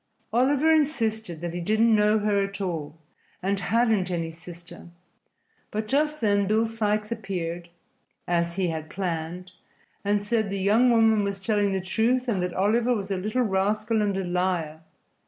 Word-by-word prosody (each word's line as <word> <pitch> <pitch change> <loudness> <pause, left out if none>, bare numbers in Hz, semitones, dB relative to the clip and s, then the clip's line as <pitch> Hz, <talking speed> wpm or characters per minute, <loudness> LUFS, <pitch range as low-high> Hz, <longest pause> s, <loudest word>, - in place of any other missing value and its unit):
Oliver 280 +6 +3
insisted 225 - 0
that 170 -1 -4
he 175 - -3
didn't 220 +5 +3
know 210 +1 +3
her 205 -1 +1
at 195 +1 -5
all 165 -5 -4 0.5
and 195 +1 0
hadn't 220 -2 +1
any 165 -2 -2
sister, 170 +1 -11 0.8
but 215 +1 -3
just 300 +4 +1
then 205 -2 +2
Bill 220 +2 +2
Sikes 215 -1 -1
appeared 175 -6 -4 0.6
(as 170 -1 0
he 185 -2 0
had 155 -1 -5
planned) 180 0 -4 0.5
and 205 0 +1
said 215 -1 0
the 200 - -3
young 215 +6 +4
woman 225 -2 +4
was 200 0 -2
telling 205 -2 +2
the 190 -1 -1
truth 235 +7 0
and 205 -6 0
that 180 -1 -3
Oliver 230 +5 +2
was 200 -2 -4
a - - +1
little 215 +7 0
rascal 215 +2 0
and 200 -2 0
a 195 - -1
liar. 175 -3 -1
200 Hz, 165 wpm, -25 LUFS, 180-220 Hz, 0.8 s, young